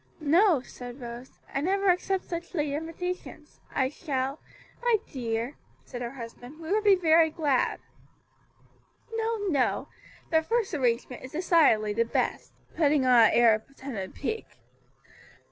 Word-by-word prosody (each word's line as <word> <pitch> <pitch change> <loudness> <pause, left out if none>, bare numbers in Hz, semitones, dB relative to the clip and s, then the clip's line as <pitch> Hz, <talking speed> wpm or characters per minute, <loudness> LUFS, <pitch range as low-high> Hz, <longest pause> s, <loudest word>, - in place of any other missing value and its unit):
"No," 330 +1 +4
said 245 0 -10
Rose, 240 +1 -9 0.2
"I 275 - 0
never 390 +4 +1
accept 370 +1 -1
such 340 +1 -6
late 295 -3 0
invitations; 330 +4 -6
I 260 -1 +1
shall 275 -1 -3 0.2
" - - -27
"My 480 -1 +3 0.2
dear," 235 0 -3 0.3
said 245 -2 -7
her 240 - -3
husband, 245 +3 -10
"we 325 +1 -6
would 425 +1 +2
be 405 -2 +6
very 325 -2 +4
glad." 295 -5 0 1.3
"No, 450 0 -1
no; 275 -6 0 0.4
the 320 -1 +4
first 450 +3 -1
arrangement 250 -3 -1
is 260 - -9
decidedly 300 - +3
the 230 +2 +2
best;" 230 - -2 0.2
putting 295 -4 +3
on 255 - +5 0.2
an - - 0
air 230 -1 +6
of 215 0 -3
pretended 260 -8 -7
pique. 440 +10 -5
290 Hz, 145 wpm, -28 LUFS, 245-345 Hz, 1.3 s, be